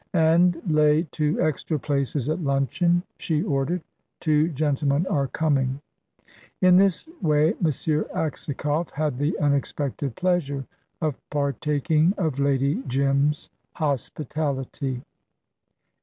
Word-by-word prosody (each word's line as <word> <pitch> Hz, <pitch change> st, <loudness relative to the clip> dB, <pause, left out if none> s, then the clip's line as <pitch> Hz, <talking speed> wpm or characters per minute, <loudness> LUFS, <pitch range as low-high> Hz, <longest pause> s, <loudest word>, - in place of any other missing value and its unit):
"And 165 Hz, +1 st, +4 dB
lay 155 Hz, 0 st, +4 dB
two 150 Hz, -1 st, 0 dB
extra 155 Hz, +1 st, 0 dB
places 140 Hz, -1 st, -1 dB
at 155 Hz, +4 st, 0 dB
luncheon," 160 Hz, +5 st, +1 dB, 0.2 s
she 155 Hz, -1 st, 0 dB
ordered; 155 Hz, 0 st, -1 dB, 0.4 s
"two 155 Hz, +1 st, +2 dB
gentlemen 145 Hz, 0 st, +1 dB
are 145 Hz, -8 st, 0 dB
coming." 135 Hz, -3 st, 0 dB, 0.8 s
In 185 Hz, -1 st, +6 dB
this 195 Hz, -, +2 dB
way 155 Hz, -1 st, +3 dB
M. -, -, -2 dB, 0.5 s
Aksakoff 150 Hz, +1 st, -2 dB
had 145 Hz, -3 st, -2 dB
the 145 Hz, +3 st, 0 dB
unexpected 140 Hz, -2 st, -1 dB
pleasure 165 Hz, -7 st, 0 dB, 0.4 s
of 150 Hz, -4 st, -1 dB
partaking 150 Hz, -, +1 dB
of 155 Hz, -7 st, -1 dB
Lady 140 Hz, 0 st, +1 dB
Jim's 140 Hz, +3 st, +1 dB, 0.2 s
hospitality. 140 Hz, -2 st, -2 dB
150 Hz, 105 wpm, -24 LUFS, 140-160 Hz, 0.8 s, In